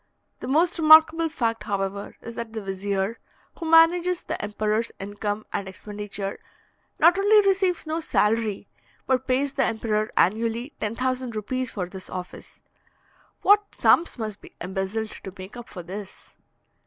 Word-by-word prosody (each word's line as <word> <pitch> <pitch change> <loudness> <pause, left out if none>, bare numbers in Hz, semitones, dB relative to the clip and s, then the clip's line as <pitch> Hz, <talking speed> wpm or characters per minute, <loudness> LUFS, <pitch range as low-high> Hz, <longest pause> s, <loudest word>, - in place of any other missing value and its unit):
The - - -6
most 330 +6 +2
remarkable 320 +1 +7
fact, 230 -6 -2
however, 200 0 -3
is 230 - -8
that 230 -1 -6
the 220 - -4
vizier, 195 +2 -2 0.4
who 330 -2 -3
manages 345 +2 +5
the - - -4
emperor's 215 +2 -1
income 205 +1 -4
and 195 - -2
expenditure, 205 0 -6 0.6
not 345 +4 +5
only 410 0 +5
receives 375 -3 +2
no 315 +1 -2
salary, 215 -8 0 0.4
but 260 0 0
pays 270 +2 +1
the 270 - +1
emperor 215 -1 -1
annually 230 - +1
10,000 255 +2 -2
rupees 255 +4 -2
for 190 -5 -3
this 185 +1 -9
office. 180 -1 -8 0.8
What 410 0 +4
sums 340 - +3
must 215 -3 -5
be - - -15
embezzled 190 +4 -3
to 190 - -7
make 190 +3 -9
up 240 0 -9
for 180 -3 -8
this! 190 +3 -9
225 Hz, 145 wpm, -25 LUFS, 205-310 Hz, 0.8 s, remarkable